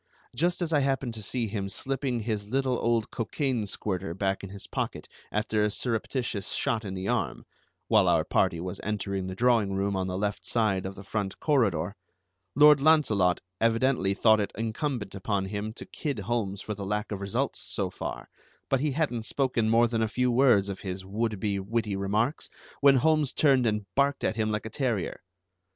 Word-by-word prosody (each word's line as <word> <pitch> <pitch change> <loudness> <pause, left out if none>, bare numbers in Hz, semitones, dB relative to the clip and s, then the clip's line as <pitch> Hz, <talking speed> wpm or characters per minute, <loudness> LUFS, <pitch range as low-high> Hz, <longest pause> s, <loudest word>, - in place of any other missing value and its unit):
Just 175 +6 +1
as 165 -1 -2
I 150 - +5
happened 135 -3 0
to 110 - -6
see 115 +3 -2
him 100 -2 -3
slipping 130 +2 -2
his 105 -2 -3
little 130 +1 0
old 115 -1 +1
cocaine 120 -1 -1
squirter 95 -4 -3
back 95 0 -1
in 100 - -6
his 100 0 -8
pocket - - -4 0.2
after 105 0 0
a 105 - +3
surreptitious 115 -2 -2
shot 115 -1 0
in 95 -2 -5
the 95 +1 -4
arm - - -1 0.4
(while 105 -4 +4
our 85 -2 +4
party 85 - +1
was 90 +1 -5
entering 100 -2 -2
the 95 - -5
drawing 115 -3 +3
room 100 +1 0
on 95 -1 -1
the 90 0 -3
left 100 0 -2
side 100 -5 0
of 95 - -7
the 100 - -10
front 100 -1 -3
corridor), 100 - +1 0.6
Lord 150 0 +7
Launcelot 110 - +4 0.2
evidently 115 -3 +2
thought 110 +1 +5
it 100 - -1
incumbent 115 -1 -2
upon 100 0 -1
him 105 +2 -4
to - - -9
kid 145 -5 -4
Holmes 100 -3 -2
for 105 - -3
the 100 -1 -6
lack 105 +2 -2
of 100 -1 -4
results 100 0 -1
so - - -3
far; - - -6 0.4
but 135 - +2
he 145 0 0
hadn't 125 -7 -1
spoken 125 -5 +1
more 115 +1 +5
than 115 -1 -1
a 110 - +2
few 125 +3 +1
words 120 -6 +4
of 100 -1 -5
his 95 -1 -5
would 105 +1 -2
be 100 0 -1
witty 105 +1 -1
remarks 105 +8 -1 0.3
when 140 -1 +6
Holmes 155 +1 +3
turned 135 -5 +4
and 105 -1 0
barked 140 0 +1
at - - +1
him 110 -1 0
like 105 0 -2
a 110 - -6
terrier. 120 -9 -2
110 Hz, 195 wpm, -28 LUFS, 100-125 Hz, 0.6 s, Lord